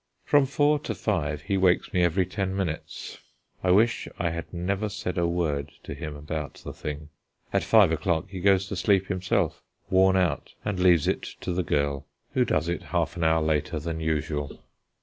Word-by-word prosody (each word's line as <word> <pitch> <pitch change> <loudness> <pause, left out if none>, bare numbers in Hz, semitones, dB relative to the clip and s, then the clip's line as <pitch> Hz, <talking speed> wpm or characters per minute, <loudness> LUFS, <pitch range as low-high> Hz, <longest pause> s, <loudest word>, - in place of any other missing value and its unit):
From 145 -2 +4
four 145 +2 +3
to 150 - -4
five 75 -8 -1
he 100 -1 0
wakes 95 -1 +2
me 90 - +3
every 90 +2 +2
ten 95 +1 -2
minutes. 90 -5 -4 0.4
I 90 - +1
wish 110 +5 +3
I 85 -1 0
had 85 0 -6
never 95 +4 -1
said 95 -2 -4
a 85 -1 +1
word 80 -5 -1
to - - -6
him 75 -1 -6
about 75 0 -5
the - - -8
thing. 75 0 -6 0.4
At - - +2
five 105 -7 +5
o'clock 85 +2 0
he 95 -1 -7
goes 95 0 +3
to - - -3
sleep 95 +1 +2
himself, 95 -1 0 0.3
worn 95 0 +5
out, 90 -5 0
and 105 -3 -1
leaves 90 -4 +4
it - - +1 0.2
to 90 - -2
the 90 - +1
girl, 70 -4 -1 0.3
who - - +3
does 80 +2 0
it 85 -2 -2
half - - -1
an 85 - -2
hour 80 0 +3
later 80 +1 0
than 80 +1 -4
usual. 75 -2 -2
90 Hz, 190 wpm, -26 LUFS, 80-95 Hz, 0.4 s, five